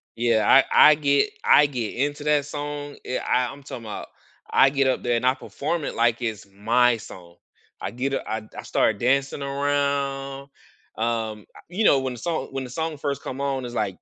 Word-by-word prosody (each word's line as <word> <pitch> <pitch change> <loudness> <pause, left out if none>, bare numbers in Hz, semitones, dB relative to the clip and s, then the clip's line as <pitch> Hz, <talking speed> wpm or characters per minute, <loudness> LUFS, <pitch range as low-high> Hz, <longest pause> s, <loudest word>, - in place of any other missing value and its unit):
Yeah, 115 -2 +2
I 135 - +7 0.3
I - - +5
get 145 - +2
I 145 - +6
get 125 -6 -3
into 145 +3 -2
that 150 -2 +2
song, 145 0 -6
I 130 - -1
I 125 -1 0
I'm 140 +1 -13
talking 125 -3 -8
'bout 110 - -7 0.4
I 135 - +6
get 135 -1 +2
up 130 - 0
there, 120 -1 +1
and 115 - -1
I 130 +1 +4
perform 155 +3 -4
it - - -3
like 115 0 +2
it's 110 -4 -4
my 115 +4 +2
song. 85 -5 -12 0.5
I - - -4
get 135 +3 -2
u - - +1
I 110 +1 -2 0.2
I - - -6
started 105 -2 +1
dancing 135 +3 +1
around, 140 -1 -1 0.5
um, 110 -2 -2
I - - -13
you 190 +5 -1
know, 140 -9 +5
when 130 -1 -3
the 120 - -9
song 160 -1 -2
when 135 -1 -4
the 125 - -8
song 160 +4 -3
first 140 0 -3
come 130 - -6
on, 135 -2 -1
it's 120 0 -7
like, 100 -5 -2
135 Hz, 210 wpm, -24 LUFS, 120-140 Hz, 0.5 s, I